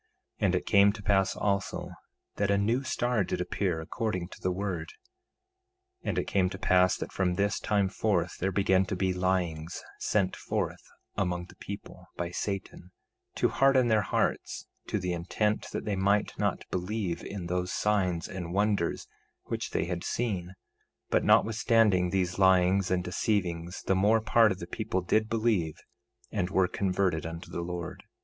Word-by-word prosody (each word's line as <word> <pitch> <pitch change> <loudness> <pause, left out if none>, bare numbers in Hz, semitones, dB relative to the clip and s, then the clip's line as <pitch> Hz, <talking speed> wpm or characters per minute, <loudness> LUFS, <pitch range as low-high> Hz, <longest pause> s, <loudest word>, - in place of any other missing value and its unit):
1:21 - - +1
And - - +2
it - - -1
came 100 0 +6
to 105 -1 -10
pass 95 -1 +2
also 100 -1 -1 0.5
that 100 -1 +1
a 100 - +3
new 115 +6 +1
star 120 -4 +1
did - - -3
appear, 90 -1 -1
according 90 +1 -3
to - - -13
the 90 - 0
word. 100 - -3 1.1
1:22 - - -2
And - - -1
it - - +2
came 95 -2 +2
to 95 - -6
pass 90 -1 +3
that - - -5
from 90 -2 0
this 100 +1 +1
time 100 -2 +1
forth 95 -2 0
there 95 +2 0
began 95 0 +3
to 95 - -3
be 95 0 0
lyings 90 -3 -1 0.2
sent 100 -3 +1
forth - - -3 0.3
among 90 -2 -1
the - - -16
people, 100 0 -9
by 85 0 -3
Satan, 95 -2 -4 0.5
to - - +2
harden 135 -3 +4
their 110 -1 +4
hearts, - - -1 0.2
to - - -1
the 90 -2 -2
intent 105 +5 -1
that - - -4
they 105 -2 0
might 100 +2 +2
not - - -1
believe 95 -1 -2
in 100 -3 -6
those 90 +1 -1
signs 95 -5 +1
and 90 -1 -5
wonders 100 -4 +1 0.4
which - - -3
they - - 0
had 85 0 -3
seen; 95 -6 -2 0.6
but - - +3
notwithstanding 110 -5 +4
these 90 0 -1
lyings 95 0 +4
and 90 0 +1
deceivings 90 -2 -1
the - - +2
more 105 +4 +4
part 110 0 +4
of 95 - -2
the 85 - -6
people 95 +1 -2
did 110 +5 +1
believe, 110 -9 +1 0.6
and 90 - -1
were 95 -1 +3
converted 90 -3 0
unto 80 +1 -7
the 85 - -3
Lord. 85 0 -5
95 Hz, 170 wpm, -29 LUFS, 90-105 Hz, 1.1 s, came